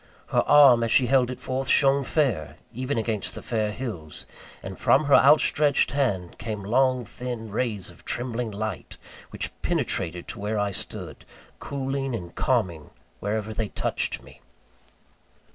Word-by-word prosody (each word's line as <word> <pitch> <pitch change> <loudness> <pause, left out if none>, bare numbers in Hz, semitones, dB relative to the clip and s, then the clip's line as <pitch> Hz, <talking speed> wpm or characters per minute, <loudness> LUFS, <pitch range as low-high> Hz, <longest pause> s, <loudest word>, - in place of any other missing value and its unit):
Her - - +3
arm, 135 -5 +7
as 115 - -1
she 130 - +5
held 125 0 +3
it 130 - -6
forth, 130 +1 -3
shone 140 +1 +4
fair, 125 - -1 0.2
even 130 +2 -3
against 110 -5 -2
the - - -7
fair 110 -3 -1
hills; 105 -11 -7 0.4
and - - -8
from 155 - +4
her 140 - +2
outstretched 145 0 +5
hand 105 -11 -1
came 105 -3 -5
long 125 +3 +2
thin 120 -1 -6
rays 105 -4 -2
of - - -19
trembling 120 -1 -2
light, 105 -1 -5 0.3
which - - -4
penetrated 85 0 -1
to 115 - -5
where 105 +2 -2
I 105 -1 0
stood, - - -6 0.4
cooling 135 -2 -3
and 85 -5 -7
calming 95 - -1 0.3
wherever 110 +1 -3
they 110 0 -2
touched - - -2
me. - - -17
115 Hz, 150 wpm, -25 LUFS, 105-130 Hz, 0.4 s, arm